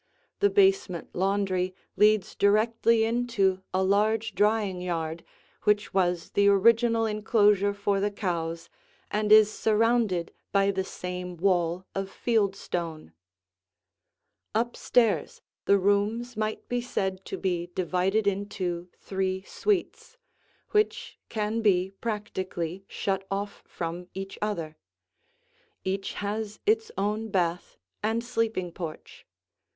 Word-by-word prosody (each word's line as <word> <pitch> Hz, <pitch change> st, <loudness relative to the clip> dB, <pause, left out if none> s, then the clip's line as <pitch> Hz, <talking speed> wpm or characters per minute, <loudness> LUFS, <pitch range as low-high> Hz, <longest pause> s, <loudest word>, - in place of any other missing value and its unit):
The 405 Hz, -, +4 dB
basement 385 Hz, -, +2 dB
laundry 185 Hz, -1 st, 0 dB, 0.2 s
leads 210 Hz, -2 st, +3 dB
directly 220 Hz, +2 st, +3 dB
into 225 Hz, -5 st, +1 dB
a 190 Hz, 0 st, +1 dB
large 215 Hz, +3 st, +2 dB
drying 205 Hz, -3 st, +1 dB
yard 165 Hz, -2 st, -3 dB, 0.4 s
which 210 Hz, -1 st, +2 dB
was 180 Hz, -2 st, +1 dB
the 200 Hz, 0 st, +3 dB
original 230 Hz, +3 st, +4 dB
enclosure 210 Hz, -2 st, +3 dB
for 200 Hz, 0 st, 0 dB
the 205 Hz, +1 st, +1 dB
cows 170 Hz, -5 st, -3 dB, 0.4 s
and 210 Hz, 0 st, 0 dB
is 215 Hz, 0 st, +7 dB
surrounded 220 Hz, -5 st, +1 dB, 0.2 s
by 200 Hz, 0 st, +3 dB
the 190 Hz, -1 st, -1 dB
same 180 Hz, -1 st, -6 dB
wall 175 Hz, 0 st, +1 dB
of 195 Hz, 0 st, -3 dB
field 210 Hz, -3 st, +1 dB
stone. 165 Hz, -, -5 dB, 1.4 s
Up 235 Hz, +2 st, 0 dB
stairs 220 Hz, -10 st, +1 dB, 0.3 s
the 200 Hz, -, +5 dB
rooms 205 Hz, +5 st, +1 dB
might 215 Hz, 0 st, -3 dB
be 245 Hz, 0 st, -1 dB
said 190 Hz, -6 st, -2 dB
to -, -, -5 dB
be 175 Hz, -2 st, -1 dB
divided 185 Hz, +4 st, +1 dB
into 190 Hz, -3 st, -2 dB
three 190 Hz, -1 st, -2 dB
suites, 420 Hz, -, -2 dB, 0.5 s
which 425 Hz, 0 st, 0 dB
can 220 Hz, +1 st, -1 dB
be 190 Hz, -3 st, +2 dB
practically 190 Hz, -5 st, -3 dB
shut 195 Hz, -1 st, -2 dB
off 200 Hz, +1 st, -4 dB
from 175 Hz, +1 st, -5 dB
each 195 Hz, 0 st, -6 dB
other: 170 Hz, -7 st, -3 dB, 1.1 s
each 195 Hz, +1 st, -2 dB
has 210 Hz, +1 st, -4 dB
its 445 Hz, +1 st, +2 dB
own 215 Hz, +2 st, -1 dB
bath 175 Hz, -3 st, -1 dB, 0.2 s
and 225 Hz, +2 st, 0 dB
sleeping 225 Hz, -7 st, -1 dB
porch. 165 Hz, -2 st, -8 dB
200 Hz, 115 wpm, -27 LUFS, 185-220 Hz, 1.4 s, is